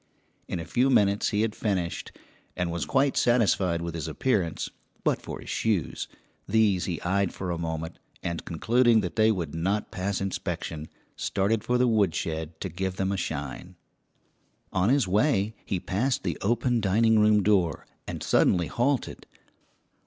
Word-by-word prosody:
In - - -3
a 80 - -5
few 125 +10 +2
minutes 100 -5 +3
he 105 - +1
had 110 -2 -1
finished, 95 -6 -2 0.5
and 90 -1 -1
was 85 -1 -3
quite 135 0 +2
satisfied 100 -8 +2
with 85 -1 -4
his 80 -4 -4
appearance, 100 -11 0 0.4
but - - +1
for - - -7
his - - -10
shoes. 105 -8 -1 0.4
These 105 -4 +3
he 85 -3 -3
eyed 95 +1 +1
for 90 -2 -3
a 85 - -3
moment, 80 0 -4 0.2
and 85 -1 -3
concluding 115 +7 +3
that 90 -3 -4
they 110 0 +4
would 85 -8 -3
not 95 +6 -1
pass 95 +2 -2
inspection, 85 -4 -4 0.3
started 100 +2 0
for 125 - +1
the 125 0 +3
woodshed 80 -7 0
to 95 - -3
give 95 +2 -3
them 95 0 -1
a - - 0
shine. 90 0 -5 1.0
On 95 +3 +2
his 135 -5 +3
way 105 +1 +2
he 95 - -2
passed 120 +10 -1
the 85 -4 -2
open 120 +2 +1
dining 110 +3 +3
room 105 -1 +4
door, 95 -5 +2 0.2
and - - -5
suddenly 90 -2 +3
halted. 125 - -1
95 Hz, 160 wpm, -27 LUFS, 85-110 Hz, 1.0 s, they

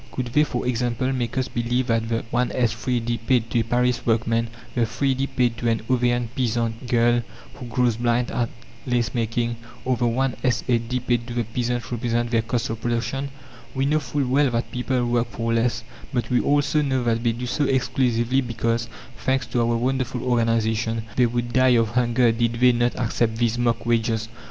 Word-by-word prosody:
Could 120 -2 -4
they, 150 +2 +5
for 125 -5 -3
example, 125 +1 0
make 125 0 -2
us 130 - +1
believe 120 +2 -1
that 115 -1 0
the 115 -1 -1
1s. 125 +1 +2
3d. 120 -1 -1
paid 120 -3 +3
to 120 - +2
a - - +2
Paris 125 +1 +1
workwoman, 115 0 +1 0.3
the 120 - 0
3d. 135 +4 0
paid 120 -2 +2
to 120 - 0
an 115 -1 +1
Auvergne 120 -1 +2
peasant 115 -1 -1
girl 120 0 +3 0.3
who 125 -3 -9
grows 120 -1 +1
blind 120 0 +1
at 120 -1 -1 0.4
lace 120 -1 0
making, 115 0 -1 0.3
or 130 0 +2
the 120 - 0
1s. 130 +3 +1
8d. 125 0 0
paid 120 -1 0
to 120 - -6
the 120 - +1
peasant 120 +2 -3
represent 120 0 -1
their 115 -2 +3
"cost 115 +2 -2
of 115 - -5
production." 120 +4 -2 0.5
We 135 +1 +1
know 150 +2 +2
full 145 -1 -2
well 135 +2 +3
that 120 0 -2
people 125 0 -1
work 120 0 0
for 115 0 -2
less, 115 0 +1 0.3
but 125 -1 -2
we 125 - +4
also 145 +1 +2
know 130 -3 0
that 115 -1 +1
they 115 -1 +2
do 120 +2 -5
so 145 +4 0
exclusively 130 -1 +1
because, 115 -1 -1 0.3
thanks 130 0 0
to 120 - +2
our 115 0 +1
wonderful 130 0 -1
organization, 115 -2 +1
they 125 -1 +4
would 120 0 -3
die 130 -1 +5
of 115 -1 +2
hunger 120 0 +3
did 115 0 0
they 125 +2 +5
not 120 0 +1
accept 115 -2 0
these 120 0 0
mock 120 -1 0
wages. 115 -1 0
120 Hz, 195 wpm, -23 LUFS, 115-125 Hz, 0.5 s, they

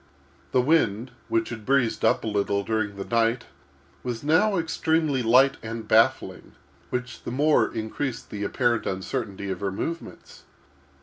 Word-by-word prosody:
The 125 - +3
wind, 125 -6 +1 0.2
which 115 0 0
had 110 -3 -7
breezed 125 -3 +1
up - - +3
a - - -3
little 100 -1 0
during 105 -1 -1
the 100 - -6
night, 115 +1 +1 0.6
was 120 -1 -4
now 185 +7 +3
extremely 160 -4 0
light 125 +4 +4
and 115 0 -6
baffling, - - +2 0.4
which 125 0 -4
the - - -6
more 145 +5 +2
increased 115 +3 -4
the 105 -1 -4
apparent 120 +1 0
uncertainty 100 0 -3
of 90 - -4
her 100 -1 -2
movements. 165 - -6
115 Hz, 145 wpm, -25 LUFS, 105-135 Hz, 0.6 s, light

